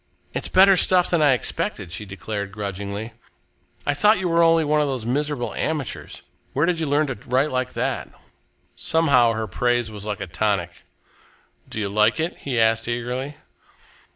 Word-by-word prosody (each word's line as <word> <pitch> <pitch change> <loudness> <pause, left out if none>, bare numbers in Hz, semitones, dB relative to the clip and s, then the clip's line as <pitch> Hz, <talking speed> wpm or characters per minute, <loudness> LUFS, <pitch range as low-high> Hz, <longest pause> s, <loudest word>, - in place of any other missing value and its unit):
"It's - - -2
better 195 +1 +6
stuff 180 -1 +3
than 170 -3 +2
I 145 -3 +5
expected," 105 -7 -2
she 105 - -5
declared 100 +1 -5
grudgingly. 100 +2 -5 0.7
"I 145 - +2
thought 210 +9 +4
you 185 0 -2
were 170 0 +3
only 165 -1 +4
one 150 +1 +2
of 145 - +1
these 130 -5 -3
miserable 140 0 -1
amateurs. 155 -5 -4 0.3
Where 145 +4 +2
did 175 -1 0
you 160 - -1
learn 145 +2 +2
to 135 - -3 0.2
write 130 +4 +2
like 130 0 -2
that?" - - -2 0.7
Somehow, 140 -8 +3
her 110 0 -2
praise 120 +3 0
was 105 -2 -8
like 105 -2 -4
a 100 - -4
tonic. 90 -1 -2 0.8
"Do - - -5
you 105 - -1
like 105 +6 +2
it?" 165 +2 -1
he 130 -4 -2
asked 115 0 +2
eagerly. 125 +4 -3
125 Hz, 175 wpm, -23 LUFS, 105-150 Hz, 0.8 s, better